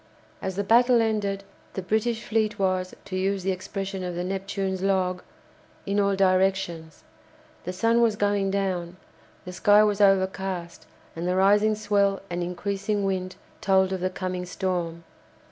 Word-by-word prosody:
As 190 -1 -3
the 200 - -1
battle 240 +3 +5
ended, 205 -3 0 0.3
the 190 - -4
British 220 +3 0
fleet 215 -1 0
was, 185 -1 -1
to 190 - -6
use 190 0 0
the 190 - +1
expression 190 +1 -4
of 180 -1 -4
the 175 - -2
"Neptune's" 195 0 -3
log, 185 -2 +1 0.6
"in 200 +1 0
all 200 -1 +2
directions." 185 -4 0 0.6
The 180 - -2
sun 230 +6 +2
was 225 -2 +3
going 205 -1 +1
down; 185 -3 -2 0.5
the 180 - -7
sky 205 +3 +5
was 210 -1 +1
overcast, 190 -3 +1 0.3
and 170 +2 -3
the 180 - +1
rising 205 +3 +4
swell 200 -2 +1
and 175 0 -2
increasing 200 +3 -2
wind 185 -1 -2 0.3
told 190 -1 +3
of 190 - -2
the 185 +1 0
coming 185 -1 -4
storm. 175 -2 -3
195 Hz, 155 wpm, -25 LUFS, 185-205 Hz, 0.6 s, battle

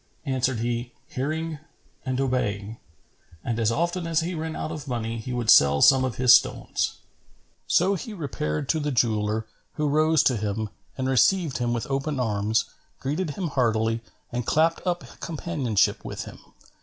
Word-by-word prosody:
Answered 130 -3 0
he, 120 +1 -2 0.2
"Hearing 155 +2 -3 0.4
and 130 -1 -2
obeying;" 115 -5 -1 0.7
and 115 -1 -2
as 110 -2 +2
often 170 +5 -1
as 165 0 +2
he 175 +3 -3
ran 160 -1 -4
out 155 - -4
of 150 -2 -7
money, 115 -2 -3
he 120 +3 -6
would 120 -3 +2
sell 70 0 +6
some 130 - +6
of 130 -3 -2
his 125 0 +7
stones. 125 - 0 0.7
So 185 +3 +3
he 200 +4 -5
repaired 135 - -3
to 160 - +2
the 150 -1 -1
jeweller, 110 -3 +1 0.3
who 150 -1 -1
rose 155 +1 +3
to 125 - +2
him 105 +1 -2 0.3
and 130 -1 -1
received 140 - +3
him 120 -1 0
with 120 -1 -1
open 135 +1 -2
arms, 105 -2 +1 0.3
greeted 155 +6 -2
him 180 -4 -2
heartily 115 -4 +1 0.3
and 120 +1 -2
clapped 160 +6 +2
up 175 -1 0 0.2
companionship 145 - 0
with - - -5
him. - - -11
130 Hz, 165 wpm, -25 LUFS, 115-155 Hz, 0.7 s, his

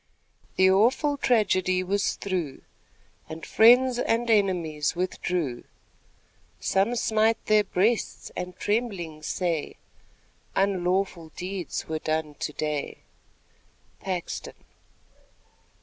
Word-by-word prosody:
The 190 - +5
awful 250 +9 +3
tragedy 185 -8 +2
was 200 +2 0
through, 175 -8 -4 0.7
And 160 0 -7
friends 245 +2 +5
and 235 0 +1
enemies 175 -8 +1
withdrew. 175 -7 -2 1.0
Some 200 +5 +1
smite 220 -1 +2
their 215 -1 +4
breasts 210 +5 0
and 180 0 -5
trembling 195 -8 -2
say, 165 -1 -2 0.8
"Unlawful 185 -3 0
deeds 185 0 -4
were 160 0 -2
done 155 -1 -2
to - - -3
day." 150 -1 -4 1.0
Paxton. 185 -3 -4
185 Hz, 90 wpm, -26 LUFS, 165-215 Hz, 1.0 s, The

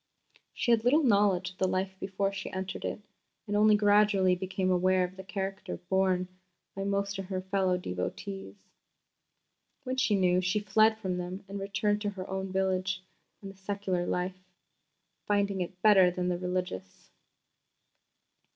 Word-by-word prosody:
She 240 - +1
had 225 -1 +4
little 290 +6 +4
knowledge 200 -6 +3
of 185 - -21
the 190 - +2
life 190 +1 -1
before 195 +1 -1
she 195 -1 -5
entered 190 0 -5
it, 210 - -4 0.4
and 205 -1 -2
only 210 0 +6
gradually 205 -2 +4
became 185 0 -1
aware 185 +1 +3
of 180 +1 -4
the 190 - -9
character 195 +1 -4
borne 185 0 +1 0.5
by 195 0 -3
most 200 0 -1
of 195 - -4
her 185 0 -3
fellow 190 -1 0
devotees. 185 - -5 1.3
When 260 0 -3
she 240 -5 +3
knew, 180 -1 +3
she 185 +3 +1
fled 215 +2 +3
from 185 -4 -3
them 180 +2 -6
and 200 +1 -5
returned 205 +1 0
to 205 - -1
her 190 -2 -7
own 190 0 -4
village 185 -1 0 0.4
and 195 0 -7
the - - -24
secular 190 -2 -2
life, 185 +1 -2 0.8
finding 200 -2 +1
it 180 +1 -5
better 195 -4 +7
than 180 0 -2
the 175 - 0
religious. 180 - -4
190 Hz, 160 wpm, -30 LUFS, 185-200 Hz, 1.3 s, better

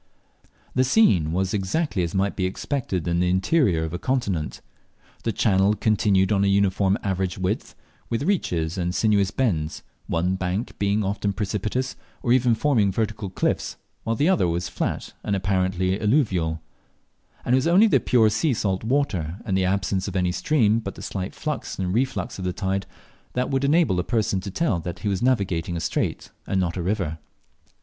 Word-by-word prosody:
The 130 - +3
scene 105 - +4
was 95 +2 0
exactly 105 - 0
such 85 - 0
as - - -8
might 100 +1 0
be 95 -2 0
expected 95 - -3
in 85 0 +1
the 90 0 +2
interior 95 - +2
of 80 0 -4
a 90 - -3
continent. 100 - -1 0.6
The 115 - 0
channel 100 -1 +3
continued 105 -3 +2
of 100 -2 +3
a - - +3
uniform 100 0 +2
average 95 -2 -1
width, 95 +3 -2 0.3
with 115 +3 -1
reaches 90 - 0
and 90 0 -1
sinuous 105 -3 +3
bends, 90 -11 -1 0.2
one 90 +3 0
bank 95 +5 -2
being 100 +1 +1
often 100 +1 -1
precipitous, 105 +6 -2 0.3
or 120 -3 +3
even 125 -2 +3
forming 110 -5 +2
vertical 105 -1 -2
cliffs, 90 - -1 0.3
while 115 - -1
the 145 +7 +2
other 185 - +3
was 85 +1 -2
flat - - -3
and 100 - 0
apparently 95 0 0
alluvial; 95 - +1 0.8
and 120 - +1
it - - +6
was 130 - 0
only 185 +6 +6
the 220 - +4
pure 110 -4 +3
salt 110 - 0
water, 110 - 0
and 95 -4 0
the 95 -1 +2
absence 95 0 0
of 100 - -5
any 90 -1 +1
stream 115 0 +2
but 115 - -6
the - - -9
slight 95 -1 -4
flux 150 -1 -4
and 90 -1 -1
reflux 130 -2 -1
of - - -5
the 90 - 0
tide, 95 0 -2 0.5
that 125 +2 -1
would 135 0 +1
enable 145 - +3
a - - 0
person 105 -2 0
to 100 - -6
tell 105 - 0
that 85 +1 -5
he - - +1
was 95 -2 0
navigating 95 -9 0
a - - -2
strait - - -2 0.2
and 95 - 0
not 85 -2 0
a 90 - -2
river. 90 -4 -2
100 Hz, 185 wpm, -24 LUFS, 90-115 Hz, 0.8 s, it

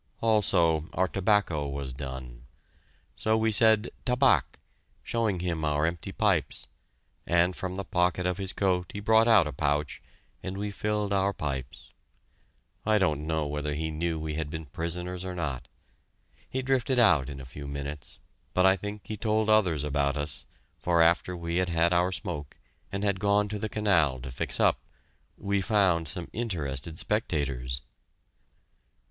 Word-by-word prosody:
Also 90 -8 +2
our 95 +2 +2
tobacco 95 -7 +1
was 70 -2 -4
done. 65 -2 -7 0.7
So 110 0 +1
we 110 0 +2
said, 110 +1 +4
"Tabac," 125 - +3 0.5
showing 110 -6 0
him 85 -3 -2
our 75 0 +1
empty 85 0 -3
pipes, - - +1 0.6
and 85 +1 +3
from 95 0 -4
the 100 - -2
pocket 90 0 +1
of 90 +1 0
his 95 -1 -2
coat 90 -3 0
he 105 - -5
brought 110 +2 +4
out 110 -7 +6
a 75 - -4
pouch, 75 0 -1 0.4
and 95 +1 -5
we 105 0 -3
filled 105 0 -1
our 100 0 +2
pipes. 65 -7 -5 0.9
I 110 0 +3
don't 75 -6 0
know 80 -1 0
whether 75 0 -3
he 80 +1 -2
knew 80 +1 -1
we 80 0 -4
had 80 -1 -3
been 80 0 -6
prisoners 90 +4 -4
or 90 -1 -5
not. 70 -7 -3 0.8
He 130 0 -2
drifted 130 -1 +1
out 80 - +4
in 70 -1 -7
a 65 - -8
few 70 +2 -9
minutes, 70 +1 -6 0.4
but 90 - +4
I 95 0 +5
think 105 +2 -6
he 110 - -4
told 110 0 0
others 90 -9 +3
about 70 -1 0
us, 75 +1 -4 0.3
for 85 -1 +3
after 85 +2 +2
we 85 0 -2
had 90 -1 +1
had 85 +1 +2
our 90 +1 +2
smoke, 75 -5 -5 0.3
and 100 +1 -3
had 100 -2 +1
gone 100 +1 +2
to 105 0 -4
the 110 - -3
canal 85 -12 +2
to 65 0 -7
fix 65 - -3
up, - - +4 0.6
we 100 0 0
found 95 -6 +2
some 90 +1 -3
interested 80 - -3
spectators. 65 - -1
85 Hz, 165 wpm, -28 LUFS, 75-100 Hz, 0.9 s, out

